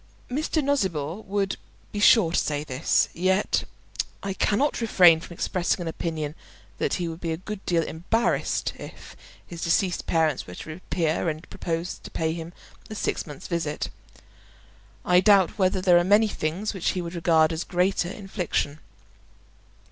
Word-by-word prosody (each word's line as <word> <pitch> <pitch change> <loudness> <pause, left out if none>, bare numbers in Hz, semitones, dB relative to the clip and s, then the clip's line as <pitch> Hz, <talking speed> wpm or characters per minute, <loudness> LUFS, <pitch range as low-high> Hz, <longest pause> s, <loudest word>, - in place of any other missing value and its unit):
Mr. 305 +3 0
Nosnibor 190 - -1
would 195 0 -1 0.3
be 205 - -4
sure 205 -4 +6
to - - +1
say 150 -1 -1
this. 135 0 +1
Yet 190 +3 +1 0.6
I 195 -1 -2
cannot 240 +8 +1
refrain 180 -7 +6
from 170 +1 -10
expressing 180 +2 0
an 175 - -4
opinion 160 -2 -3 0.5
that - - +1
he 175 -2 -2
would 165 +1 -7
be 165 - -2
a 160 - -2
good 200 +3 -7
deal 170 -2 +2
embarrassed 195 +10 0
if - - -11 0.3
his 170 -1 -9
deceased 175 +2 +1
parents 160 -4 +1
were 90 - -8
to - - -9
reappear 165 0 -1
and 155 +2 -6
propose 170 +1 -3
to - - -10
pay 160 0 -1
him 165 0 -6 0.4
a 215 - -6
six 205 - -2
months' 145 -3 -9
visit. 165 -4 -2 1.1
I 180 0 +5
doubt 195 0 +4
whether 185 0 +2
there 180 -2 +6
are - - +2
many 205 +4 +5
things 190 +3 -2
which 190 -4 -1
he 185 - -2
would 170 0 -6
regard 165 -2 +3
as 160 - -3
a - - -6
greater 180 0 +1
infliction. 180 -7 -3
175 Hz, 165 wpm, -25 LUFS, 160-195 Hz, 1.1 s, sure